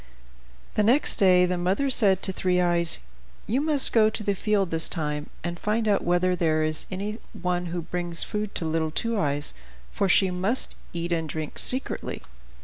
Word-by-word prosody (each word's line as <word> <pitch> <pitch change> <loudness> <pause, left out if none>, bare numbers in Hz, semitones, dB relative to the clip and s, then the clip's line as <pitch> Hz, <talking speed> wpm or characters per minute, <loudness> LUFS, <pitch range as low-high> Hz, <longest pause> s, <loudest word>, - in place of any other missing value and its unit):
The - - +1
next 240 +8 +3
day 180 -2 +5
the 180 0 -1
mother 195 +10 0
said 195 -6 +3
to 190 - +1
Three 180 -1 +1
Eyes, 175 -1 +3 0.5
"You 250 +6 0
must 295 -3 +1
go 215 -2 +5
to 220 0 -5
the 200 - +1
field 200 -2 0
this 165 0 +3
time, 150 -2 -3
and 175 0 -4
find 220 +1 0
out 205 -2 +2
whether 175 +1 +2
there 155 -2 +1
is 155 0 -1
anyone 185 -3 -4
who 170 0 -4
brings 175 0 0
food 210 -1 -4
to 165 - -2
little 160 0 0
Two 230 +7 -1
Eyes; 145 -1 -1 0.4
for 195 - 0
she 190 0 +4
must 190 +8 -1 0.2
eat 170 0 -4
and 165 -2 -1
drink 155 0 -5
secretly." 255 +2 -2
180 Hz, 180 wpm, -25 LUFS, 170-210 Hz, 0.5 s, day